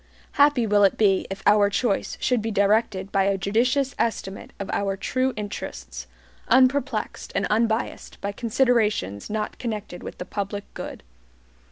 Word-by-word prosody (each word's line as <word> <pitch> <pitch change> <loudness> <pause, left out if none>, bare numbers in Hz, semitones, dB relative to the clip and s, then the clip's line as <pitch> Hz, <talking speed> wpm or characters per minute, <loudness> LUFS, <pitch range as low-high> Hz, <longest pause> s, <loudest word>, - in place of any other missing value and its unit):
Happy 285 -4 +4
will 205 -1 +4
it 195 - +4
be 195 -3 +3
if 195 0 -6
our 205 -1 +5
choice 200 0 -1
should 250 -3 +1
be 225 - -2
directed 200 -1 +1
by 195 -1 +2
a 195 0 +2
judicious 250 +7 +1
estimate 195 -4 -2
of 200 - -4
our 195 -1 -1
true 255 +6 0
interests, - - -6 0.4
unperplexed 260 +3 +2
and - - +1
unbiased 220 +1 -1
by 200 - -3
considerations 215 - +1
not 215 0 -3
connected 210 -6 -5
with - - -8
the 180 - -6
public 200 +1 -4
good. - - -7
210 Hz, 150 wpm, -24 LUFS, 195-235 Hz, 0.4 s, our